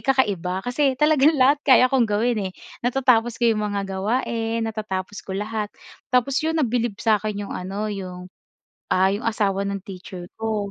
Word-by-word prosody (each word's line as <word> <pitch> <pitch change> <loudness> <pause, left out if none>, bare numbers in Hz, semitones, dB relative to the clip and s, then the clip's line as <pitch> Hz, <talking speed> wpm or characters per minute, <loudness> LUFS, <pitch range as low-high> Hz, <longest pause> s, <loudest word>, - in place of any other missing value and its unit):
kakaiba 195 -9 0
kasi 260 +1 +1
talagang 300 +1 +4
lahat 280 +2 +4
kaya 255 -2 +5
kong 240 -4 +3
gawin, 220 +2 +1
eh. 190 -1 -3 0.3
Natatapos 240 -2 +2
ko 240 - -1
'yong 215 - -2
mga 200 -1 -1
gawain, 225 +3 -1
natatapos 210 -2 -4
ko 190 -2 -6
lahat. 210 0 -3 0.4
Tapos 255 +2 +2
'yon 320 +1 -1
nabilib 240 -6 0
sa'kin 215 -2 +1
'yong - - -7
ano, 195 +3 -4
'yong, 185 -2 -7 0.6
ah, 190 +1 +4
'yong 205 +3 -3
asawa 200 -3 0
ng 200 -1 -3
teacher 185 -2 -9
ko. 215 -2 -2
220 Hz, 165 wpm, -23 LUFS, 195-250 Hz, 0.6 s, kaya